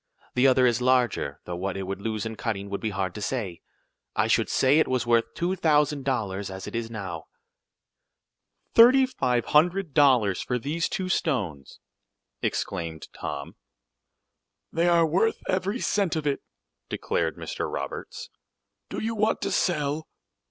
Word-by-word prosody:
The 125 +2 +4
other 130 -1 +5
is 120 -1 +2
larger, 125 - +1
though 90 - -4
what 95 +2 -3
it 95 - -3
would 95 +1 -5
lose 110 -1 -2
in 110 0 -4
cutting 100 -3 -4
would 100 - -3
be 110 - -1
hard 95 -2 -2
to 105 - -7
say. 100 -8 -3 0.5
I - - +2
should - - +2
say 135 +4 +4
it - - +3
was 130 -2 0
worth 115 -1 +2
two 175 +2 0
thousand 150 -5 +2
dollars 100 -7 -1
as 95 0 -7
it - - -7
is 115 -1 -3
now." 95 -8 -6 1.5
"Thirty 255 +3 +8
five 125 - 0
hundred 175 +1 +2
dollars 125 - +4
for 125 - -1
these 150 +7 -2
two 185 - -2
stones!" 105 - -2 0.6
exclaimed 80 -3 -3
Tom. 70 0 -6 1.2
"They 170 +2 +2
are 170 -1 +5
worth 190 +8 +2
every 190 +5 0
cent 200 -8 +1
of 155 -1 -2
it," 140 -1 0 0.5
declared - - -1
Mr. - - -4
Roberts. 70 0 -6 0.6
"Do - - -4
you 225 +1 -1
want 215 0 +1
to - - -1
sell?" 150 -2 0
125 Hz, 160 wpm, -26 LUFS, 100-165 Hz, 1.5 s, Thirty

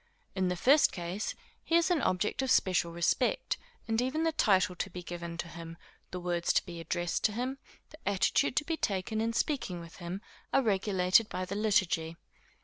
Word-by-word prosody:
In 190 -1 0
the 180 - 0
first 275 - +5
case, 180 +3 -4 0.3
he 330 - +1
is 340 +1 +4
an 335 -5 +2
object 190 +7 0
of 265 - -1
special 180 -6 +3
respect; 170 0 0 0.3
and 225 +1 +1
even 270 +6 0
the 325 - +2
title 190 -11 +3
to - - -2
be 180 - -8
given 170 -1 -6
him, 170 -1 -7 0.3
the 180 - -5
words 175 -1 0
to - - +2
be 170 -2 -7
addressed 175 +1 -2
to 215 - +4
him, 255 +4 -3 0.3
the 305 - -13
attitude 200 +7 +2
to 300 - +1
be 325 0 -1
taken 205 - -1
in 225 +1 0
speaking 190 - -2
to 165 - -16
him, 180 +2 -5 0.3
are 270 - +3
regulated 195 -1 +3
by 185 - -3
the 185 - -5
liturgy. 190 -6 +1
190 Hz, 190 wpm, -31 LUFS, 175-230 Hz, 0.3 s, first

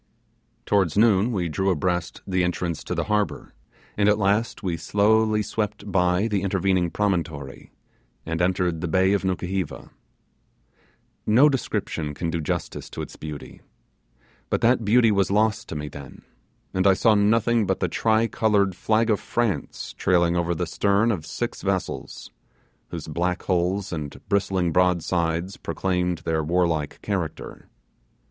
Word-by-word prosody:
Towards 95 -4 +1
noon 110 0 +4
we 90 -6 -1
drew 95 +5 0
abreast 90 0 -1
the 95 -2 0
entrance 90 -2 -2
go - - -4
the - - 0
harbour, 105 -1 -1 0.4
and 105 0 +3
at 105 - +3
last 105 +3 0
we 90 -3 -1
slowly 105 +5 +2
swept 105 -1 -3
by 90 +2 +2
the 105 -4 0
intervening 95 -2 +1
promontory, 80 -9 -3 0.5
and 80 +1 -2
entered 90 -2 0
the 90 - -2
bay 95 +4 +3
of 100 - 0
Nukuheva. 95 -1 -3 1.4
No 125 +8 +6
description 80 - -2
can 85 +2 -2
do 85 0 -2
justice 75 - -4
to - - -5
its - - -10
beauty; 75 -2 -8 0.9
but - - 0
that 120 0 +3
beauty 115 +2 +4
was 100 -2 +2
lost 105 +1 +1
to - - -5
me 75 0 -4
then, 70 -1 -11 0.5
and 95 +1 +2
I 95 - +6
saw 110 +3 +4
nothing 110 +1 +3
but 95 - 0
the - - +1
tri 110 0 +2
coloured 105 -4 +1
flag 110 +4 +1
of 105 - +2
France 120 -4 -2
trailing 85 -1 +2
over 85 0 0
the - - -1
stern 100 +3 +2
of 90 -8 -4
six - - -4
vessels, - - -3 0.6
whose 85 -3 -7
black 85 +3 -2
hulls 90 +2 0
and 75 -3 -5
bristling 95 -3 +1
broadsides 85 0 +1
proclaimed 90 -3 -2
their 80 -1 0
warlike 80 -2 0
character. - - -4
95 Hz, 150 wpm, -24 LUFS, 85-105 Hz, 1.4 s, No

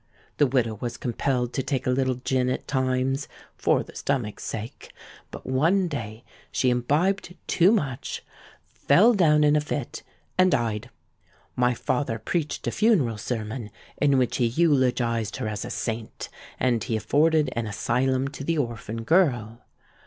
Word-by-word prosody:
The 145 - +4
widow 115 -5 0
was 120 0 -4
compelled 125 0 -1
to 135 - 0
take 135 -1 -2
a 125 - +2
little 130 0 +1
gin 125 0 0
at 130 - -3
times 130 +1 0 0.3
'for - - +2
the - - -15
stomach's 125 -7 -2
sake;' 110 +1 -6 0.4
but - - -10
one 165 +9 +2
day 115 -7 -6 0.3
she 130 - +2
imbibed 170 +10 0
too 180 +3 +4
much, 140 - -2 0.5
fell 205 +12 +5
down 155 -7 +4
in 150 0 +4
a 150 - +3
fit, 145 -3 -4 0.4
and 185 0 +6
died. 120 - -1 0.7
My 125 0 +2
father 125 0 -1
preached 150 +7 -3
a - - 0
funeral 155 - +2
sermon, 110 0 -4 0.3
in 140 -2 +3
which 125 -2 +1
he 120 - +2
eulogised 125 -6 +1
her 125 -4 -3
as 105 0 -3
a - - -6
saint; 115 -1 -4 0.3
and 120 -3 +1
he 115 - -2
afforded 150 +6 +2
an 115 -2 -3
asylum 130 +5 0
to 140 -1 -8
the 165 +3 0
orphan 115 -4 -3
girl. 120 - +2
130 Hz, 155 wpm, -25 LUFS, 115-145 Hz, 0.7 s, and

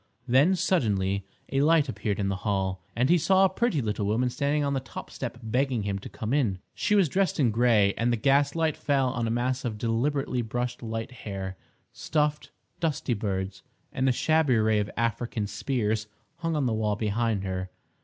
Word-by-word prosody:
Then, 140 +10 +5
suddenly, 100 - 0 0.2
a 135 - +2
light 155 0 +4
appeared 105 -4 -2
in 100 - 0
the 95 -1 -1
hall, 95 -1 -1
and 125 +2 +2
he 175 +3 +4
saw 190 +4 +4
a - - +3
pretty 190 - 0
little 105 -1 -1
woman 120 +4 +1
standing 145 +3 0
on 140 0 0
the 135 - +1
top 130 - -9
step 120 -2 -5
begging 125 0 0
him 100 -1 -2
to - - -9
come 110 +3 -4
in. 120 -10 +1 0.2
She 210 - +1
was 195 -4 +5
dressed 190 +3 0
in 125 -6 +3
grey, 110 -3 +4
and 120 +1 +1
the 120 - +1
gaslight 140 +5 +2
fell 135 -3 +1
on 120 -2 -2
a - - -1
mass 125 +3 -1
of 115 -4 -3
deliberately 125 +3 0
brushed 120 +2 -3
light 115 +1 -4
hair. 95 -5 -6 0.4
Stuffed, 150 -1 -1 0.3
dusty 155 -6 0
birds, 95 -3 -3 0.3
and 130 +1 +1
a - - +5
shabby 155 0 +2
array 110 -1 +3
of 105 +1 -2
African 115 -1 -1
spears, 105 0 -1 0.3
hung 165 -1 -2
on 145 -3 +1
the 120 - +1
wall 105 -1 0
behind 110 -1 0
her. 95 -1 -3
120 Hz, 195 wpm, -27 LUFS, 105-140 Hz, 0.4 s, Then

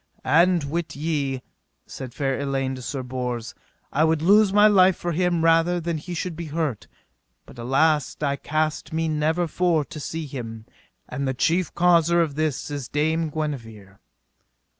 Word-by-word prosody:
And 170 +4 +4
wit 160 +4 -3
ye 145 -2 -1
well, 130 - -8 0.4
said 125 -2 -9
fair 135 -2 -1
Elaine 135 -1 -1
to 130 - -7
Sir 130 +1 -4
Bors, 125 -2 -4 0.4
I 150 - +3
would 160 -1 +2
lose 205 +2 +5
my 205 +1 +6
life 190 -3 +6
for 175 - -3
him 175 0 +1
rather 165 +2 +3
than 170 -1 -3
he 175 +3 -7
should 175 0 -3
be 170 0 -6
hurt; 150 -6 -3 0.6
but 120 - -14
alas, 145 +5 +1
I 140 -2 0
cast 155 +2 -2
me 160 0 0
never 160 +3 0
for 165 -2 +1
to 155 - -9
see 160 +2 -4
him, 115 -5 -7 0.4
and 140 -1 -3
the 130 - -1
chief 170 +7 +1
causer 170 -1 +4
of 160 -4 +1
this 150 -1 -2
is 140 -4 -4
Dame 160 +2 0
Guenever. 115 -10 -6
155 Hz, 170 wpm, -24 LUFS, 135-170 Hz, 0.6 s, my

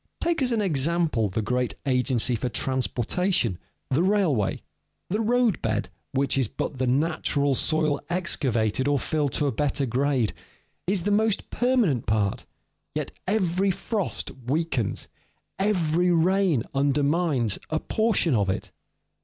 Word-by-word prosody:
_ - - -51
Take 335 -3 0
as 255 -1 +3
an 225 -3 +1
example 155 - +1
the 105 +4 -2
great 125 +3 -1
agency 125 -2 +2
for 125 +2 -2
transportation, 130 - 0 0.3
the 135 +5 +3
railway. 180 - +1 0.5
The 210 +3 +1
roadbed, 235 -2 +1 0.2
which 135 0 +1
is 130 - +2
but 130 +5 -5
the 130 - +1
natural 145 0 +1
soil 155 +1 +1
excavated 130 - 0
or 145 0 +3
filled 145 +1 -1
to 150 - +1
a 140 - +1
better 140 +3 0
grade, 130 -1 0 0.5
is 190 -2 +1
the 205 - 0
most 215 0 +1
permanent 240 - +1
part; 105 -2 0 0.5
yet - - -2 0.2
every 190 -1 +1
frost 200 +1 -2 0.2
weakens, 135 -7 -1 0.5
every 180 -4 +2
rain 175 - +3
undermines, 140 - +1
a 155 - 0
portion 215 -8 +1
of 100 -4 +2
it. 95 - -3
150 Hz, 135 wpm, -25 LUFS, 125-185 Hz, 0.5 s, as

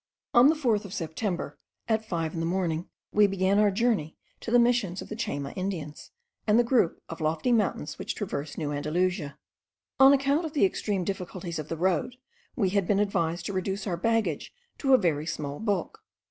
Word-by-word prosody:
On 240 +3 +8
the 315 - +4
4th 235 -8 +1
of 195 -2 -7
September, 175 +3 -3 0.3
at 220 -1 +1
five 165 -7 -3
in 165 - -4
the 165 - -1
morning, 175 -2 -1 0.2
we 210 0 +5
began 195 +1 +2
our 210 -1 +5
journey 200 -6 0 0.2
to - - -6
the 245 - +5
Missions 235 -7 +2
of - - -8
the 215 - -5
Chayma 145 -10 -3
Indians 180 -6 -5 0.4
and 210 +1 +5
the 240 - +5
group 235 -8 +1
of 165 0 -8
lofty 160 +9 0
mountains 210 -9 0
which - - -4
traverse 155 -8 -4
New 150 -3 -2
Andalusia. 150 0 -1 0.6
On 270 0 +9
account 280 +3 +2
of 315 -2 -5
the 280 - +4
extreme 195 0 -1
difficulties 180 -2 -4
of 155 - -6
the 165 - -3
road, 185 +7 0 0.4
we 205 -8 +1
had 195 -1 +1
been 200 -1 +2
advised 170 -4 0
to 200 - -3
reduce 190 +1 -2
our 185 -4 -1
baggage 205 -4 0 0.3
to 270 -2 +5
a - - +6
very 160 -7 0
small 145 -3 -4
bulk. 205 -5 -2
190 Hz, 195 wpm, -27 LUFS, 165-220 Hz, 0.6 s, On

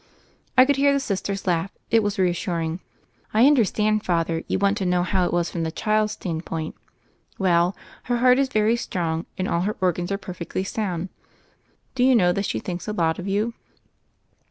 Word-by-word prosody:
I 255 - +9
could 285 0 +2
hear 280 0 +4
the 280 - +2
Sister's 200 -5 -3
laugh: 175 0 0 0.2
it 225 0 +5
was 205 0 -2
re 185 -1 +3
assuring. 170 -1 -2 0.6
"I 225 +3 +6
understand. 215 -6 +3
Father; 165 -2 0
you - - 0
want 200 +1 +2
to - - -1
know 180 0 +2
how 180 0 +1
it - - -3
was 175 -1 0
from 170 - -3
the 160 0 -2
child's 215 +3 0
standpoint. 165 -2 -4 0.6
Well, 180 -1 +2 0.3
her 245 -1 0
heart 250 +2 +5
is 275 -1 +2
very 215 0 +2
strong, 165 -6 -2
and 185 - -1
all 170 - 0
her 210 +4 -2
organs 180 0 0
are 200 - 0
perfectly 185 -1 -5
sound. 190 -3 -3 0.8
Do 250 - +1
you 260 0 +5
know 180 -6 +4
that 200 +3 -1
she - - -2
thinks 175 +1 -6
a 210 - -2
lot 165 -4 0
of 180 - -5
you 210 +4 0
190 Hz, 195 wpm, -23 LUFS, 175-215 Hz, 0.8 s, I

